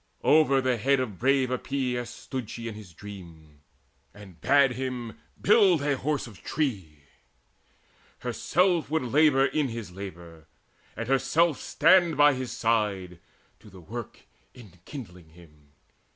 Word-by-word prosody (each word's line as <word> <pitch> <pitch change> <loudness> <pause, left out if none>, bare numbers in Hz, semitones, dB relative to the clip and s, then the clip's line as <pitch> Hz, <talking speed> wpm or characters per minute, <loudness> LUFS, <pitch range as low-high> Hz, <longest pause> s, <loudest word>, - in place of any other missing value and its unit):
Over 145 -3 +4
the 130 -2 0
head 135 +5 +2
Of 110 -8 -4
brave 130 0 +2
Epeius 125 -2 -2
stood 120 -1 -7
she 115 0 -6
in 115 - -5
his 105 -4 -12
dream, 85 -6 -12 0.5
And 100 -4 -14
bade 140 +1 +4
him 125 -2 -5 0.2
build 195 -8 +4
a 145 -1 +1
Horse 145 +2 -2
of 110 -6 -13
tree: 95 - -3 1.2
herself 175 -4 +1
Would 160 -2 0
labour 135 +1 +4
in 150 0 0
his 115 -5 -7
labour, 85 -4 -10 0.5
and 115 - -4
herself 150 +4 +2
Stand 175 -4 +3
by 145 0 +6
his 130 -1 -5
side, 100 -6 -1 0.4
to - - -16
the 95 -1 -14
work 115 +6 -8 0.3
enkindling 90 - -12
him. 75 -4 -20
120 Hz, 135 wpm, -27 LUFS, 95-140 Hz, 1.2 s, by